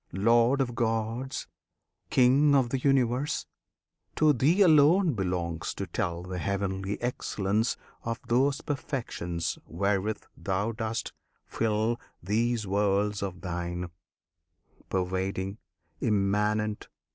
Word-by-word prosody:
Lord 115 Hz, +7 st, +4 dB
of 120 Hz, -2 st, -1 dB
Gods! 115 Hz, +3 st, -1 dB, 0.6 s
King 135 Hz, +3 st, +5 dB
of 130 Hz, -3 st, +3 dB
the 135 Hz, -, 0 dB
Universe! 135 Hz, +1 st, +1 dB, 0.7 s
To 155 Hz, -1 st, +5 dB
Thee 150 Hz, -, +3 dB
alone 160 Hz, +1 st, +5 dB
Belongs 90 Hz, -5 st, -2 dB
to -, -, -3 dB
tell 85 Hz, 0 st, -2 dB
the 90 Hz, 0 st, -5 dB
heavenly 100 Hz, +1 st, -2 dB
excellence 110 Hz, -2 st, 0 dB, 0.3 s
Of 115 Hz, 0 st, -3 dB
those 135 Hz, +4 st, +2 dB
perfections 100 Hz, -, -3 dB
wherewith 100 Hz, +4 st, -1 dB
Thou 100 Hz, +3 st, -1 dB
dost 110 Hz, 0 st, -3 dB, 0.3 s
fill 110 Hz, +1 st, 0 dB, 0.2 s
These 115 Hz, +3 st, 0 dB
worlds 100 Hz, +1 st, +1 dB
of 95 Hz, -2 st, -4 dB
Thine; 90 Hz, -1 st, -4 dB, 1.0 s
Pervading, 95 Hz, +2 st, -2 dB, 0.4 s
Immanent! 105 Hz, +1 st, +1 dB
110 Hz, 100 wpm, -28 LUFS, 95-125 Hz, 1.0 s, King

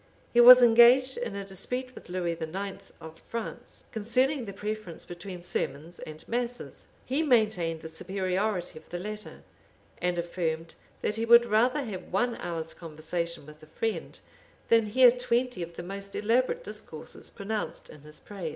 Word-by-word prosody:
He 240 Hz, -, +7 dB
was 250 Hz, +1 st, +11 dB
engaged 240 Hz, +3 st, +6 dB
in 235 Hz, -4 st, -4 dB
a 200 Hz, 0 st, -4 dB
dispute 250 Hz, +7 st, -4 dB
with -, -, -13 dB
Lewis 175 Hz, -2 st, -2 dB
IX. 190 Hz, +5 st, -5 dB
of 160 Hz, 0 st, -11 dB
France, 235 Hz, +1 st, -7 dB
concerning 250 Hz, +5 st, +1 dB
the 200 Hz, -, -6 dB
preference 210 Hz, -3 st, -6 dB
between 175 Hz, 0 st, -8 dB
sermons 165 Hz, -1 st, -4 dB
and 155 Hz, 0 st, -10 dB
masses: 245 Hz, +1 st, -4 dB, 0.2 s
he 270 Hz, +5 st, 0 dB
maintained 215 Hz, -, +2 dB
the -, -, -7 dB
superiority 185 Hz, +1 st, -2 dB
of -, -, -23 dB
the 175 Hz, -, -4 dB
latter, 210 Hz, +3 st, -7 dB, 0.6 s
and 180 Hz, -1 st, 0 dB
affirmed, 165 Hz, -1 st, -3 dB, 0.3 s
that 210 Hz, -, 0 dB
he 225 Hz, -, 0 dB
would 235 Hz, +1 st, +7 dB
rather 240 Hz, +6 st, +2 dB
have 205 Hz, -7 st, -7 dB
one 235 Hz, +5 st, +1 dB
hour's 165 Hz, -2 st, -4 dB
conversation 165 Hz, 0 st, -5 dB
with 150 Hz, +1 st, -14 dB
a 155 Hz, -, -14 dB
friend, 225 Hz, +7 st, -4 dB, 0.5 s
than 225 Hz, -2 st, +5 dB
hear 250 Hz, +3 st, +7 dB
twenty 245 Hz, -3 st, -1 dB
of 170 Hz, 0 st, -6 dB
the 175 Hz, -, -6 dB
most 195 Hz, +2 st, -7 dB
elaborate 255 Hz, -, +1 dB
discourses -, -, -9 dB
pronounced 210 Hz, +1 st, -5 dB
in -, -, -13 dB
his 150 Hz, +1 st, -13 dB
praise. 195 Hz, -6 st, -6 dB
200 Hz, 160 wpm, -28 LUFS, 170-235 Hz, 0.6 s, was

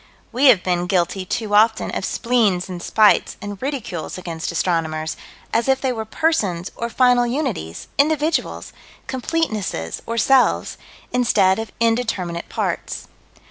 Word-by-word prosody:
We 255 Hz, +4 st, +1 dB
have 235 Hz, -9 st, +6 dB
been 180 Hz, -1 st, 0 dB
guilty 185 Hz, 0 st, 0 dB
too 210 Hz, +2 st, -3 dB
often 220 Hz, +2 st, +3 dB
of -, -, -2 dB
spleens 215 Hz, -7 st, +1 dB
and 180 Hz, -2 st, -6 dB
spites 215 Hz, +2 st, +3 dB
and 205 Hz, -2 st, -7 dB
ridicules 255 Hz, -, -4 dB
against 170 Hz, -2 st, -5 dB
astronomers, 160 Hz, -2 st, -1 dB, 0.4 s
as 230 Hz, +2 st, +1 dB
if 265 Hz, 0 st, +3 dB
they 260 Hz, -2 st, 0 dB
were 220 Hz, -2 st, -4 dB
persons, 215 Hz, -, 0 dB
or 235 Hz, -, -3 dB
final 245 Hz, 0 st, +3 dB
unities, 235 Hz, -, -3 dB
individuals, 310 Hz, +2 st, 0 dB, 0.3 s
completenesses, 220 Hz, -, -2 dB
or 230 Hz, -, -3 dB
selves 265 Hz, +2 st, +3 dB, 0.3 s
instead 215 Hz, -6 st, +3 dB
of 225 Hz, -, -5 dB
indeterminate 225 Hz, -7 st, -1 dB
parts. -, -, -3 dB
220 Hz, 135 wpm, -21 LUFS, 180-250 Hz, 0.4 s, have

